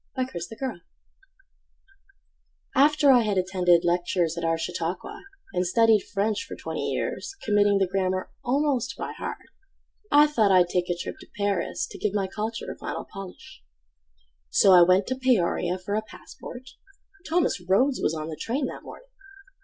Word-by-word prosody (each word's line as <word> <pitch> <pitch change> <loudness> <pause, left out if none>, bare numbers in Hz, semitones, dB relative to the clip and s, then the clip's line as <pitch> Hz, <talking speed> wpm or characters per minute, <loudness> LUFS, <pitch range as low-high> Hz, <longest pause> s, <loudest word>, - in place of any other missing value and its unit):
Ida 255 0 -1 0.2
Chicken 225 -4 -5 1.9
After 290 +1 +5
I 250 -2 +6
had 210 -3 -1
attended 180 -2 +2
lectures 175 -1 0
At 170 - -5
our 165 0 +1
Chautauqua, 180 - -4 0.3
and 180 0 0
studied 225 +2 +4
French 210 +3 0
For 265 - -8
twenty - - -4
years, 395 - -3
committing 205 -1 +3
the 195 - +3
grammar 185 0 -2
Almost 255 -3 0
by - - -5
heart, - - -6 0.7
I 295 +1 +7
thought 230 -9 +2
I'd 180 -2 +5
take 180 0 -1
a 175 - -1
trip - - -6
to - - -14
Paris 200 -2 -1
To - - -11
give 210 -1 -1
my 200 -2 +1
culture 215 +4 -4
a - - -9
final - - -5
polish. 190 - -10 0.9
So 195 - +5
I 180 -1 +8
went 185 +3 +5
to 260 - -2
Peoria 230 -8 +1
for 185 +2 -5
a 215 - +1
passport— 250 +3 -11 0.6
(Thomas 335 - +1
Rhodes 225 +10 +2
was 160 - 0
on 155 0 -5
the 160 - -5
train 250 - -2
that - - -6
morning.) - - -12
200 Hz, 160 wpm, -25 LUFS, 180-250 Hz, 1.9 s, I